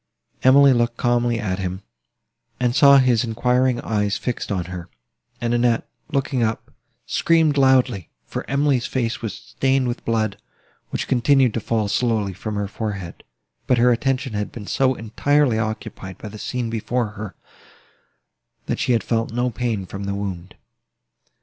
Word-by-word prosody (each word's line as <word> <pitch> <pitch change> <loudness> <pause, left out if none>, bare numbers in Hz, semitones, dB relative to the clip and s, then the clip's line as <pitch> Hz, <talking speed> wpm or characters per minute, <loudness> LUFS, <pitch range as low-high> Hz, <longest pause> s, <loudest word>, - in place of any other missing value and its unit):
Emily 135 +1 +7
looked 120 0 0
calmly 120 -1 +1
at 95 -3 -2
him, 95 +1 -4 0.8
and 125 -1 +1
saw 140 0 +8
his 125 -4 +3
enquiring 125 +2 +1
eyes 105 -2 0
fixed 125 -3 -4
on 90 -4 -1
her: 90 0 -7 0.5
and 120 -1 -1
Annette, 120 -1 +2 0.2
looking 135 -2 0
up, 110 -1 -2 0.3
screamed 165 -3 +2
loudly; 130 - +3 0.2
for - - -5
Emily's 140 -3 +1
face 120 -1 -2
was 110 -4 -4
stained 135 -1 0
with 120 +1 -4
blood, 110 -3 0 0.5
which - - -3
continued 130 -1 +3
to - - -1
fall 110 -1 -1
slowly 105 -2 0
from 105 +3 -5
her 100 -1 -1
forehead: 100 -4 -5 0.4
but 125 - +3
her 125 +1 +5
attention 130 +1 0
had 105 0 -3
been 110 -4 -8
so 130 +4 +1
entirely 120 +2 +1
occupied 105 -4 -5
by 105 - -8
the 105 +1 -10
scene 120 -1 -3
before 115 +1 -1
her, 105 -2 -8 1.3
that - - -2
she 125 - +2
had 115 - +1
felt 115 -1 -1
no 120 +2 0
pain 110 -3 -2
from 100 +2 -6
the 100 0 -2
wound. 95 -3 -5
115 Hz, 155 wpm, -22 LUFS, 105-125 Hz, 1.3 s, saw